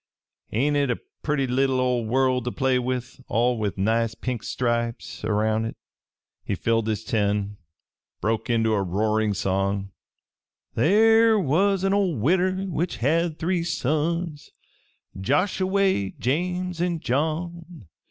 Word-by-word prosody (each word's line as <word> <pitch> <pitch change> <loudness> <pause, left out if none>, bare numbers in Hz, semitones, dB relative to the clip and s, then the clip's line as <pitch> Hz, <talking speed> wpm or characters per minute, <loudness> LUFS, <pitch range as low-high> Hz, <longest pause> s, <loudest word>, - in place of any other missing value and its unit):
Ain't 140 +7 +1
it 140 -2 +1
a 120 - 0 0.2
perty 145 -3 0
leetle 130 +1 +1
ol' 125 -2 +1
world 130 +1 +2
to 125 - -1
play 130 -1 +1
with, 125 +1 -4
all 120 +1 +1
with 105 -3 -2
nice 115 +3 +1
pink 125 -1 -4
stripes 120 -1 -2
erroun' 110 +1 +1
hit?" 115 - -5 0.7
He 100 - -2
filled 115 +3 0
his 110 -1 -1
tin 105 -3 +1
and 100 0 -2 0.6
broke 110 +4 -1
into 115 -1 +2
a 100 - +1
roaring 105 +3 0
song: 95 +1 -1 0.8
_There 225 +4 +5
was 190 +5 +2
a 195 0 +2
ol' 195 -5 +1
widder 185 - +1
which 175 -1 -2
had 160 +5 +1
three 175 +1 0
sons 155 +1 -1 0.7
Joshuway, 185 - +1
James 180 +6 -1
an' 175 -2 0
John. 160 - -3
130 Hz, 135 wpm, -24 LUFS, 110-170 Hz, 0.8 s, There